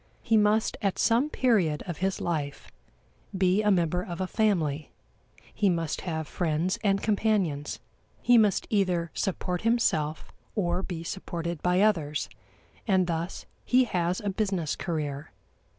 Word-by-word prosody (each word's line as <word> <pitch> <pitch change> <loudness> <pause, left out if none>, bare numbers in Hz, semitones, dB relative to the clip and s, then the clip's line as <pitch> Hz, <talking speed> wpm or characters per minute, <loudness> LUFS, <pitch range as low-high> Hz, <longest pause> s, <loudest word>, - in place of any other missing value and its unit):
He 225 - +2
must, 215 +1 +3
at 195 -3 0
some 245 +6 +3
period 200 - +2
of 175 -4 -5
his 190 +1 0
life, 150 -5 -3 0.7
be 190 +2 +3
a 210 - +2
member 180 -2 +2
of 175 -1 -6
a 185 - 0
family; 165 -9 0 0.6
he 200 - +2
must 165 -3 -1
have 160 -4 -3
friends 170 +3 -1
and 195 -1 +2
companions; 200 -9 0 0.4
he 245 - +4
must 210 -4 +4
either 180 -5 +1
support 180 -1 -2
himself 160 -10 0 0.2
or 180 -2 0
be 175 -4 -5
supported 170 -2 -4
by 180 +1 +2
others, 160 -9 +1 0.6
and 190 -3 +3
thus 170 +1 -3 0.2
he 255 +1 +4
has 180 -5 -1
a 205 -1 -2
business 190 -6 -1
career. 150 -4 -3
180 Hz, 140 wpm, -27 LUFS, 165-205 Hz, 0.7 s, he